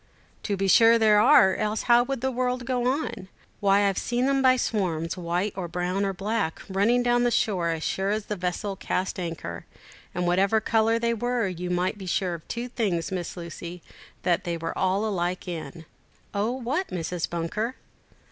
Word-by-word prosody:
"To 200 -2 -2
be 195 0 0
sure 230 +4 +7
there 215 -2 +5
are, 215 -5 +6
else 215 +1 -1
how 240 0 +5
would 270 -2 -3
the 265 0 0
world 250 0 -1
go 245 0 0
on? 260 -8 -2 0.3
Why, 200 0 +4
I've 195 - 0
seen 245 +2 0
'em 275 0 +2
by 255 -1 +5
swarms, 175 -9 -1
white 180 +3 -2
or 185 -2 -4
brown 180 +3 -1
or 195 - 0
black, 200 -2 -2
running 210 +6 +2
down 240 0 +3
to 240 - +2
the - - +4
shore, 190 -7 +1
as 160 -1 -2
sure 190 +1 -1
as 210 0 -1
the 210 - -3
vessel 185 +2 -3
cast 185 0 -2
anchor; 165 - -5 0.5
and 180 0 -1
whatever 195 +5 +3
colour 225 +1 +2
they 235 0 0
were, 240 -1 0
you 180 -1 -4
might 180 +3 -1
be 190 - -7
sure 180 0 0
of 165 -2 -8
two 235 +1 -4
things, 200 -10 -1
Miss 180 -1 -4
Lucy, 170 0 -8 0.4
that 175 -2 +1
they 170 -1 -2
were 165 0 -4
all 190 +3 +1
alike 185 -3 -2
in." 165 -1 -6 0.5
"Oh, 205 +2 0
what, 260 +9 -2
Mrs. 175 -1 -3
Bunker?" 175 +9 -2
195 Hz, 195 wpm, -26 LUFS, 175-235 Hz, 0.5 s, sure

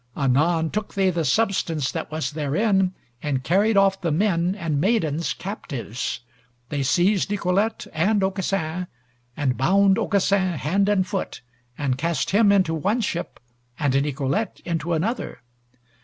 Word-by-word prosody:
Anon 155 +5 +2
took 210 -1 -4
they 190 -1 +3
the 170 -1 -1
substance 165 -8 +1
that - - -4
was 155 -4 -2
therein 185 +6 +1 0.3
and 135 -3 -2
carried 200 +7 +2
off 195 -1 +3
the 170 -3 0
men 180 +1 +1
and 160 -7 -1
maidens 170 -6 +1
captives. 135 - -5 0.5
They 145 - -2
seized 175 +10 +2
Nicolete 200 +2 0
and 195 +5 +2
Aucassin, 185 -3 -1 0.5
and 135 -4 0
bound 195 +7 +4
Aucassin 195 -2 +1
hand 195 +9 +1
and 195 -3 +2
foot, 195 0 -4 0.4
and 135 -3 -1
cast 165 -1 -1
him 205 +1 +5
into 190 -5 +3
one 200 +10 0
ship, 170 -5 -3 0.4
and 145 -3 0
Nicolete 145 +8 -2
into 170 0 -2
another. 200 - -2
175 Hz, 140 wpm, -23 LUFS, 150-200 Hz, 0.5 s, him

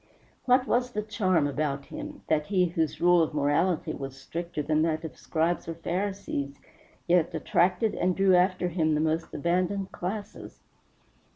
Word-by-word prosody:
What 255 0 +4
was 245 0 0
the 210 - -2
charm 190 -7 +1
about 145 -1 -2
him, 300 -1 -8
that 150 -1 +1
he 185 -3 +3
whose 165 -3 -1
rule 175 0 +5
of 160 -1 -1
morality 155 +4 +1
was 135 -1 -7
stricter 165 +2 -4
than 155 +1 +1
that 160 0 0
of 160 - -7
Scribes 165 +2 -1
or 165 - -4
Pharisees 170 -5 -3 0.5
yet 170 -2 +2
attracted 180 +6 +2
and 180 0 0
drew 195 -1 +4
after 180 0 +2
him 160 -3 +1
the - - +1
most 160 +1 0
abandoned 185 +4 -1
classes? 200 +3 -6
175 Hz, 160 wpm, -27 LUFS, 155-190 Hz, 0.5 s, rule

